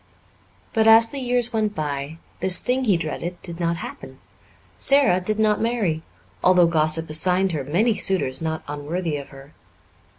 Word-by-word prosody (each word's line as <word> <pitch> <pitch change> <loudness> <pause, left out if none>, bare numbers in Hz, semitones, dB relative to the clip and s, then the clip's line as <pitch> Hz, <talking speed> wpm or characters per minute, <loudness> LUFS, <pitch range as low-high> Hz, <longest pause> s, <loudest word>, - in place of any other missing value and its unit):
But, 220 -1 +2
as 225 +1 +6
the 280 - -5
years 245 -1 0
went 215 -2 -1
by, 145 0 -4 0.2
this 185 -1 +3
thing 255 +1 0
he 200 -6 +2
dreaded 170 +2 -5
did 170 -1 -6
not 170 -1 -1
happen. - - -10 0.6
Sara 275 -10 +3
did 215 +4 -1
not 215 -1 +1
marry, 220 -9 -1 0.4
although 180 -1 +5
gossip 160 0 +1
assigned 180 +5 +2
her 150 -4 -3
many 195 - +1
suitors 185 -10 +1
not 160 -1 -4
unworthy 150 +3 -4
of 140 - -9
her. 135 +2 -15
180 Hz, 160 wpm, -22 LUFS, 155-220 Hz, 0.6 s, as